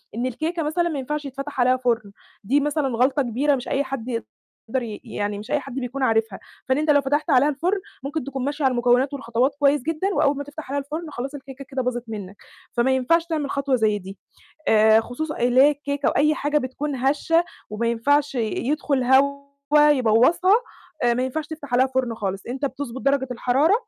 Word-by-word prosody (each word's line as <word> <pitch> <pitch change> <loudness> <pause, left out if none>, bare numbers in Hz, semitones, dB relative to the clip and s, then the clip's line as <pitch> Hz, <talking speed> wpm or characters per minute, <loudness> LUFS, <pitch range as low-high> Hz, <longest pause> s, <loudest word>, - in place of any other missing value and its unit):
إن 240 - -1
الكيكة 315 +7 -2
مثلًا 340 +3 0
ما 300 -4 -3
ينفعش 295 +3 -4
يتفتح 275 0 -6
عليها 255 +1 +4
فرن، 235 -5 -1 0.3
دي 270 +8 +2
مثلًا 295 0 0
غلطة 260 +3 +2
كبيرة، 270 +4 +1
مش 255 -1 -6
أي 275 - 0
حد 265 -4 -5 0.6
يقدر 255 +3 -1
ي 215 -3 -7
يعني 205 0 -3
مش 210 - -9
أي 295 - +2
حد 275 -2 -9
بيكون 265 +1 -3
عارفها، 225 -4 +1 0.3
فإن 260 - +3
أنت 305 +1 -1
لو 285 -1 +4
فتحت 290 +4 -1
عليها 275 0 +5
الفرن، 345 +8 0 0.2
ممكن 295 +2 -3
تكون 270 -1 -4
ماشي 290 +1 -2
على 265 - +4
المكونات، 245 +3 +2
والخطوات 260 0 0
كويس 285 -1 +3
جدًا، 325 +6 -1
وأول 280 -4 +2
ما 285 - -3
تفتح 290 -1 -9
عليها 285 - 0
الفرن 310 +3 -6
خلاص 270 +2 -5
الكيكة 270 0 -10
كده 265 0 -3
باظت 245 -1 -2
منك، 200 -3 -7 0.4
فما 240 +2 +1
ينفعش 330 +6 +2
تعمل 310 -4 -2
خطوة 275 -1 0
زي 215 -3 +1
دي. 195 +1 -10 0.5
آآ 220 0 +6
خصوصًا 300 +7 -5
اللي 245 +1 +3
هي 290 - +7
الكيكة، 285 -1 -3
أو - - +3
أي 300 +2 +4
حاجة 295 +1 0
بتكون 280 +1 -4
هشّة، 295 +6 +2 0.3
وما 215 +2 -2
ينفعش 275 +5 +1
ي - - -1 0.3
يدخل 290 -3 0
هوا 280 +2 +3
يبوظّها، 260 - +4 0.5
آآ 240 -1 +3
ما 250 - 0
ينفعش 290 +4 -3
تفتح 295 -5 -6
عليها 255 +2 +4
فرن 260 -3 -1
خالص، 195 -3 -4
إنت 260 +4 -4
بتظبط 265 -2 -4
درجة 275 -1 +1
الحرارة، 260 - +2
270 Hz, 200 wpm, -23 LUFS, 245-290 Hz, 0.6 s, هي